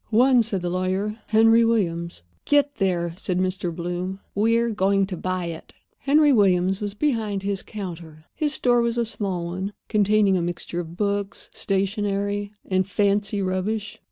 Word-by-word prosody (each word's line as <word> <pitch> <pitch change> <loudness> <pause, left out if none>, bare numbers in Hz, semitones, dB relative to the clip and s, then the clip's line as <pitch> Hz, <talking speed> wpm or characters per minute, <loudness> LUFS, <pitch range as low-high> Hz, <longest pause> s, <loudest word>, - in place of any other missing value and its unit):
"One," 245 +3 +5
said 205 -5 -2
the 175 - -1
lawyer. 190 +4 -1
"Henry 225 +1 +5
Williams's." 170 - -1 0.2
"Get 285 -1 +2
there," 175 -3 0
said 185 -2 -2
Mr. 185 -1 -1
Bloom. 180 +3 -4
"We're 230 +3 +2
going 195 -1 +2
to 190 -1 -5
buy 185 0 -2
it." 165 -1 -8 0.2
Henry 295 +1 +4
Williams 190 -3 +3
was 205 -1 -4
behind 220 -7 -1
his 200 -1 -1
counter. 170 -6 -8
His 300 -2 -1
store 245 -2 +3
was 235 0 0
a 235 - +1
small 195 -6 -3
one, 185 +4 -4 0.2
containing 210 -2 +3
a 180 - +1
mixture 175 0 -4
of 170 0 -7
books, 200 -1 -2
stationery, 200 +1 -1
and 185 0 0
fancy 200 0 +1
rubbish. 200 +3 -2
200 Hz, 155 wpm, -24 LUFS, 185-215 Hz, 0.2 s, One